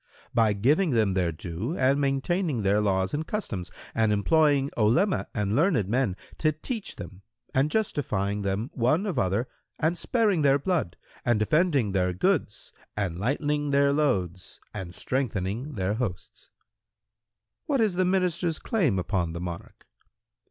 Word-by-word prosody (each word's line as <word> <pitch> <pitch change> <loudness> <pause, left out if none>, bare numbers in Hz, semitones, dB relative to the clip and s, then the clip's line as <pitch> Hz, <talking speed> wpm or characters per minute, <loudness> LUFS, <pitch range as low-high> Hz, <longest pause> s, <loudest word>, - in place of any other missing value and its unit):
"—"By 110 -3 +3
giving 145 - +2
them 110 -7 +2
their 90 -2 +1
due 85 - -4
and 135 +2 +3
maintaining 140 - 0
their 100 +2 +3
laws 95 -2 0
and 150 +2 -1
customs[FN#112] 100 - -4 0.2
and 110 -1 +2
employing 140 +6 +3
Olema 140 - +2
and 105 -1 0
learned 150 - +2
men 115 -3 +1 0.2
to 155 - +3
teach 200 - -5
them 90 +2 -9 0.3
and 135 +3 +2
justifying 105 - -1
them, 100 +6 -2
one 150 - +1
of 195 - -1
other, 100 +6 0 0.3
and 160 +3 +1
sparing 210 -3 +1
their 140 -1 +4
blood 155 - -1 0.3
and 120 -2 +2
defending 140 - +2
their 90 -1 +1
goods 150 - -1 0.2
and 90 -5 -2
lightening 145 - 0
their 140 0 +3
loads 95 - -1
and 95 -4 -7
strengthening 125 +1 -2
their 95 0 0
hosts." 105 -7 -5
Q - - -40 1.2
"What 280 -3 +1
is 215 -4 +2
the 185 +1 +1
Minister's 180 -3 +1
claim 165 - 0
upon 90 -3 -1
the 85 - -5
Monarch?" 85 -1 -7
125 Hz, 150 wpm, -27 LUFS, 100-155 Hz, 1.2 s, their